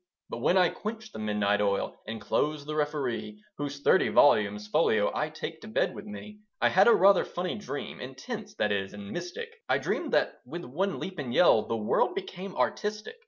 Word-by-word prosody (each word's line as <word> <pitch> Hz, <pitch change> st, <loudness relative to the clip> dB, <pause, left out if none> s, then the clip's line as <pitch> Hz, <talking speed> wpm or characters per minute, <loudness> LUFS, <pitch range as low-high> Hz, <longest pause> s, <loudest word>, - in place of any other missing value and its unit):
But -, -, -4 dB
when 185 Hz, -, +3 dB
I 180 Hz, -2 st, +5 dB
quenched 220 Hz, +1 st, -6 dB
the -, -, -7 dB
midnight 105 Hz, -1 st, +1 dB
oil, 100 Hz, -1 st, -1 dB
And 110 Hz, +1 st, -5 dB
closed 145 Hz, +7 st, -1 dB
The 155 Hz, -, -4 dB
Referee, 150 Hz, -, -2 dB, 0.2 s
Whose 140 Hz, -1 st, -4 dB
thirty 190 Hz, -, +4 dB
volumes 105 Hz, -6 st, +4 dB
folio 110 Hz, -5 st, +2 dB
I 150 Hz, -, -1 dB
take 160 Hz, +1 st, -7 dB
to -, -, -10 dB
bed 220 Hz, -, 0 dB
with -, -, -9 dB
me, 210 Hz, 0 st, -9 dB, 0.2 s
I -, -, +4 dB
had -, -, +5 dB
a 235 Hz, -, +8 dB
rather 195 Hz, 0 st, +6 dB
funny 180 Hz, +1 st, -3 dB
dream, 200 Hz, -9 st, -6 dB
Intense, 130 Hz, +1 st, -7 dB
that 105 Hz, -, 0 dB
is, 95 Hz, -1 st, -2 dB
and 100 Hz, -1 st, -8 dB
mystic; 175 Hz, -, -5 dB, 0.2 s
I -, -, +4 dB
dreamed -, -, -2 dB
that, -, -, +2 dB
with 165 Hz, +8 st, -7 dB
one 185 Hz, +10 st, -1 dB
leap 185 Hz, -3 st, -6 dB
and 130 Hz, -4 st, -4 dB
yell, 120 Hz, -6 st, +5 dB
The 115 Hz, -, -1 dB
world 110 Hz, -, +1 dB
became 195 Hz, -, -6 dB
artistic. 210 Hz, -, -2 dB
150 Hz, 200 wpm, -28 LUFS, -, 0.2 s, a